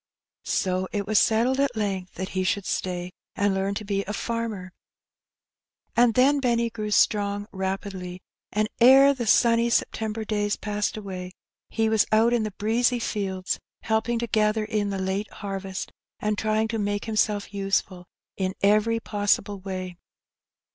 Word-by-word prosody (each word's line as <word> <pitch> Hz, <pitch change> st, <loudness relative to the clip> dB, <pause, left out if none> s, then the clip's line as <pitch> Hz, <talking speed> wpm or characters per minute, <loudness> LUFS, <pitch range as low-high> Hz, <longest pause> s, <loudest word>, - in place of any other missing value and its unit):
So 185 Hz, -1 st, 0 dB
it 205 Hz, -2 st, -2 dB
was 215 Hz, +1 st, +3 dB
settled 240 Hz, +4 st, +2 dB
at 280 Hz, -3 st, +1 dB
length 195 Hz, -4 st, -3 dB
that 185 Hz, +1 st, -4 dB
he 185 Hz, 0 st, -1 dB
should 195 Hz, +1 st, 0 dB
stay, 180 Hz, -1 st, -3 dB, 0.2 s
and 200 Hz, -1 st, +1 dB
learn 195 Hz, +1 st, -1 dB
to 215 Hz, -, -5 dB
be 200 Hz, -1 st, -1 dB
a 210 Hz, -, -4 dB
farmer; 220 Hz, -5 st, -3 dB, 1.2 s
and 235 Hz, -1 st, +4 dB
then 280 Hz, +3 st, +4 dB
Benny 235 Hz, -3 st, +1 dB
grew 215 Hz, -2 st, -4 dB
strong 205 Hz, -1 st, +2 dB
rapidly, 190 Hz, -1 st, -4 dB, 0.3 s
and 215 Hz, +1 st, +1 dB
ere 270 Hz, +3 st, +8 dB
the 240 Hz, -4 st, -4 dB
sunny 235 Hz, +2 st, +4 dB
September 220 Hz, -1 st, -1 dB
days 205 Hz, -1 st, 0 dB
passed 210 Hz, 0 st, -2 dB
away, 185 Hz, -3 st, -6 dB, 0.4 s
he 225 Hz, -1 st, 0 dB
was 220 Hz, -1 st, +3 dB
out 225 Hz, +2 st, +4 dB
in 240 Hz, -, +2 dB
the 215 Hz, -, -1 dB
breezy 230 Hz, +5 st, +1 dB
fields 195 Hz, -5 st, -2 dB, 0.2 s
helping 225 Hz, +2 st, 0 dB
to 235 Hz, -, -1 dB
gather 215 Hz, 0 st, +1 dB
in 210 Hz, -2 st, -1 dB
the 195 Hz, -, -2 dB
late 190 Hz, +2 st, -2 dB
harvest, 195 Hz, -2 st, -5 dB, 0.3 s
and 210 Hz, 0 st, 0 dB
trying 215 Hz, +1 st, 0 dB
to 225 Hz, -1 st, -2 dB
make 205 Hz, 0 st, -1 dB
himself 210 Hz, -2 st, 0 dB
useful 195 Hz, -2 st, -1 dB, 0.3 s
in 190 Hz, -1 st, -1 dB
every 215 Hz, +3 st, +3 dB
possible 205 Hz, -2 st, 0 dB
way. 185 Hz, -2 st, -6 dB
210 Hz, 155 wpm, -25 LUFS, 195-225 Hz, 1.2 s, ere